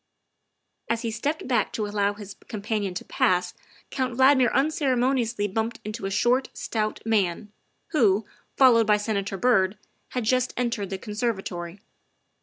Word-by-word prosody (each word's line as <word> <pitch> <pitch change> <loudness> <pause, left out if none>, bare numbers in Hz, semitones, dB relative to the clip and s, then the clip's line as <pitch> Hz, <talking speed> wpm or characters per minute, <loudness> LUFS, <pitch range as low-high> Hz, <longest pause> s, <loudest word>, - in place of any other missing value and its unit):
As 230 +1 0
he 230 - -1
stepped 285 +8 -3
back 240 -5 +1
to 215 - -2
allow 205 -1 0
his 205 -1 -9
companion 210 -3 -3
to - - -5
pass 180 -1 +1 0.4
Count 255 -3 -2
Valdmir 260 -2 +5
unceremoniously 260 -6 +1
bumped 225 +3 -2
into 215 -1 -4
a - - -3
short, 240 +6 +2
stout 215 -1 -2
man, 210 -2 0 0.4
who, 215 - +3 0.3
followed 235 -5 +6
by 210 -1 +5
Senator 205 -2 -2
Byrd, 190 -3 +2 0.3
had 250 - -2
just 255 +3 +1
entered 230 -5 -1
the 195 - -3
conservatory. 195 -4 -4
220 Hz, 140 wpm, -25 LUFS, 205-250 Hz, 0.4 s, followed